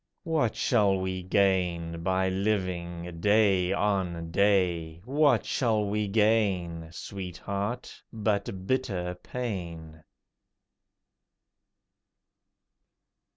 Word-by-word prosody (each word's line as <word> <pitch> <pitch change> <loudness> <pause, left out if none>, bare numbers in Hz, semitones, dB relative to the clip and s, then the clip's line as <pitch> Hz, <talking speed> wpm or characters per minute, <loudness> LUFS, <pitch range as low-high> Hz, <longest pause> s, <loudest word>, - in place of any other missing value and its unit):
What 155 - 0
shall 100 -5 +2
we 95 0 -2
gain 90 -3 +1
by 95 +1 +1
living 90 -3 -2
day 100 -3 +3
on 95 -5 -1
day? 90 -5 +2
What 145 +3 +3
shall 110 -5 +1
we 105 +1 -1
gain, 95 -6 +1
Sweetheart, 100 +6 -5
but 100 -4 -2
bitter 95 -7 -1
pain? 85 -10 -5
95 Hz, 75 wpm, -28 LUFS, 85-105 Hz, -, day